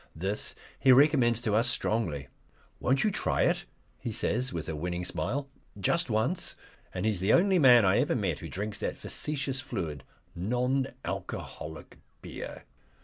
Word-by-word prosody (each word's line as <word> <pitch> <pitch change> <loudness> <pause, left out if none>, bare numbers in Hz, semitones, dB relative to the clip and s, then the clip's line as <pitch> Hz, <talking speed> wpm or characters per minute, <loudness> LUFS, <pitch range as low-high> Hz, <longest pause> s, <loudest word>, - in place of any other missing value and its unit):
This 95 +6 -2 0.2
he 130 - +6
recommends 130 -4 +5
to 110 -3 0
us 115 +3 +4
strongly. 85 - -1 0.5
"Won't 135 +2 +2
you 215 - +2
try - - +1
it?" - - +1 0.3
he 115 - -4
says, 125 +4 -1
with 80 -2 -4
a 80 - -3
winning 90 +3 -3
smile. 140 +9 -2 0.3
"Just 170 - +1
once." 110 +11 0 0.4
And 90 +2 -3
he 110 - +3
is 100 - -2
the 95 +4 +3
only 190 0 +5
man 125 -6 +7
I 95 - +4
ever - - +2
met - - -1
who - - -7
drinks 105 +2 -4
that - - -3
facetious 140 -3 -2
fluid, 80 - -4 0.3
non 125 +8 0 0.2
alcoholic 80 +1 -6 0.2
beer. - - -7
115 Hz, 160 wpm, -29 LUFS, 95-135 Hz, 0.5 s, man